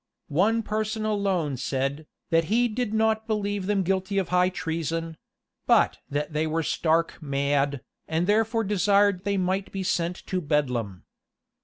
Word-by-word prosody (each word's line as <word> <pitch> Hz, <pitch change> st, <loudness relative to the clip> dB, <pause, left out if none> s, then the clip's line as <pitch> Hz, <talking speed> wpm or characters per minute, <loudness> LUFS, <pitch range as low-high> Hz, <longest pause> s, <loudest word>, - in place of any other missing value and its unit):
One 215 Hz, +9 st, +2 dB
person 215 Hz, +1 st, -2 dB
alone 195 Hz, -9 st, 0 dB
said, 135 Hz, +4 st, -2 dB, 0.2 s
that 165 Hz, 0 st, +3 dB
he 235 Hz, +7 st, +2 dB
did 235 Hz, 0 st, -2 dB
not 220 Hz, 0 st, +1 dB
believe 205 Hz, -3 st, -1 dB
them 200 Hz, -2 st, +1 dB
guilty 190 Hz, +2 st, -1 dB
of 190 Hz, -3 st, 0 dB
high 180 Hz, 0 st, +3 dB
treason; 165 Hz, -1 st, -3 dB, 0.5 s
but -, -, +4 dB
that 145 Hz, +2 st, -2 dB
they 155 Hz, +1 st, 0 dB
were 160 Hz, +1 st, -1 dB
stark 165 Hz, +2 st, 0 dB
mad, 140 Hz, -1 st, 0 dB, 0.3 s
and 160 Hz, +2 st, 0 dB
therefore 225 Hz, +3 st, +2 dB
desired 200 Hz, -1 st, +2 dB
they 200 Hz, -1 st, +1 dB
might 190 Hz, +1 st, -1 dB
be 195 Hz, -1 st, -3 dB
sent 175 Hz, -1 st, 0 dB
to 185 Hz, -1 st, -2 dB
bedlam. 125 Hz, -, -1 dB
185 Hz, 150 wpm, -26 LUFS, 155-205 Hz, 0.5 s, but